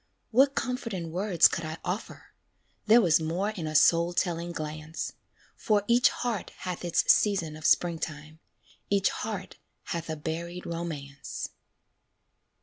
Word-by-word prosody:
What 270 +4 +4
comfort 250 -4 -2
in 170 -3 -5
words 185 0 +4
could 170 - -4
I 155 +1 -5
offer? 190 +5 -5 0.5
There 230 +3 +7
was 165 -5 +4
more 175 +6 -1
in 175 -7 -5
a 155 - -4
soul 170 +3 +5
telling 175 -1 -1
glance; 155 0 -5 0.4
For 210 -2 +1
each 240 +1 +5
heart 235 -5 -3
hath 180 -1 -4
its 175 -1 +4
season 180 -7 0
of 155 +1 -1
springtime, 155 -2 0 0.5
Each 200 -1 +2
heart 200 -4 -5 0.3
hath 170 -1 -4
a 160 - -2
buried 170 +3 -5
romance. 155 -5 -5
170 Hz, 140 wpm, -28 LUFS, 160-200 Hz, 0.5 s, There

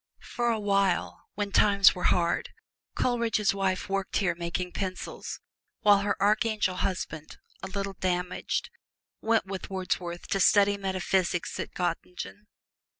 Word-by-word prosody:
For 240 0 +1
a 225 -2 +1
while, 200 -2 0
when 205 -1 -2
times 200 -1 +6
were 180 - -5
hard, 170 -1 +2 0.5
Coleridge's 230 -5 +1
wife 190 -2 -1
worked 195 0 -1
here 185 -4 +1
making 170 +1 -3
pencils, 185 -1 -5 0.4
while 205 -3 +6
her 200 0 -1
archangel 210 -2 +2
husband 160 -5 -3 0.2
(a - - -5
little 195 0 -4
damaged) 180 - -2 0.5
went 225 -1 +2
with 190 -1 -6
Wordsworth 180 -2 -3
to 195 - +1
study 205 +1 +5
metaphysics 190 -2 -1
at - - -5
Gottingen. 180 +3 -4
195 Hz, 130 wpm, -28 LUFS, 180-205 Hz, 0.5 s, times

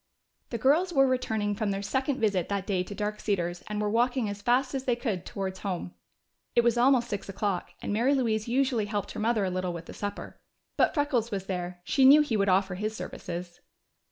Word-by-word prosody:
The 235 - -3
girls 300 +10 +3
were 270 -4 +5
returning 220 -5 0
from 205 0 -1
their 195 0 -2
second 265 +6 -1
visit 195 -6 +1
that 200 -2 -1
day 190 -3 0
to 190 +3 -6
Dark 210 0 -3
Cedars 175 -4 -1
and 210 0 -3
were 210 - 0
walking 240 +2 +1
as 205 0 -6
fast 250 +4 +2
as 265 -1 -3
they 245 - +2
could 220 -8 -3
towards 190 -1 -4
home. 185 -3 -4 0.6
It 235 - +5
was 235 -1 +3
almost 245 0 +4
six 205 -3 -5
o'clock, 195 -2 -2
and - - -2
Mary 245 +7 +3
Louise 220 -4 0
usually 250 -3 +1
helped 205 -1 -3
her - - -6
mother 220 -2 +1
a 185 - -1
little 185 -1 -2
with 170 0 -7
the - - -10
supper. 205 0 -6 0.4
But - - +2
Freckles 280 -6 +1
was 195 -4 -3
there; 180 -1 -4
she 270 - +2
knew 280 +3 +9
he 290 -7 0
would 200 -1 +2
offer 190 0 +2
his 215 +4 -3
services. 175 -4 -6
210 Hz, 215 wpm, -28 LUFS, 195-245 Hz, 0.6 s, knew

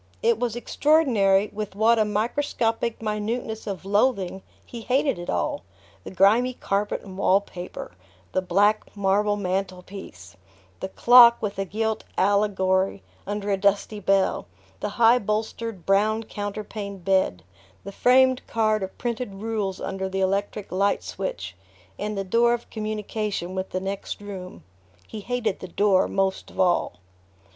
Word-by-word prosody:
It 230 -1 +3
was 240 -2 -1
extraordinary 235 -7 +2
with 210 -2 -5
what 225 +2 +4
a 215 - +3
microscopic 225 +1 -1
minuteness 220 +1 -3
of 190 -2 -5
loathing 200 -2 +1 0.2
he 235 - -8
hated 265 -2 +1
it 175 - -7
all: 290 -1 -1 0.4
the - - -7
grimy 215 +7 +3
carpet 205 -1 -2
and 190 -2 -10
wallpaper, 190 -2 -1 0.4
the 185 - 0
black 205 +4 +1
marble 205 +1 +2
mantel 185 -2 -2
piece, 95 - -11 0.4
the 190 - -4
clock 235 +2 +7
with 205 -2 -4
a 195 - 0
gilt 220 +3 -2
allegory 195 -1 +1 0.2
under 205 0 -2
a 195 - +2
dusty 200 +2 +1
bell, 195 - +1 0.3
the - - -2
high 235 +1 +6
bolstered 215 -1 -3
brown 215 +3 +2
counterpaned 205 -2 -6
bed, 190 - +1 0.4
the 200 - -7
framed 255 +4 +4
card 215 -2 +1
of 190 0 -6
printed 235 -4 -3
rules 205 -2 -3
under 190 0 -3
the 195 0 -3
electric 200 +1 -1
light 200 +2 +1
switch, 100 - -5 0.4
and 210 0 -3
the 195 - -1
door 235 +5 +3
of 235 - -12
communication 215 -3 -3
with 190 0 -3
the 185 - -2
next 195 +1 -5
room. 185 - -9 0.4
He 220 - -7
hated 225 -2 -2
the 185 - -7
door 195 +1 +2
most 195 -1 -1
of - - -13
all... 180 - +2
205 Hz, 145 wpm, -24 LUFS, 190-225 Hz, 0.4 s, clock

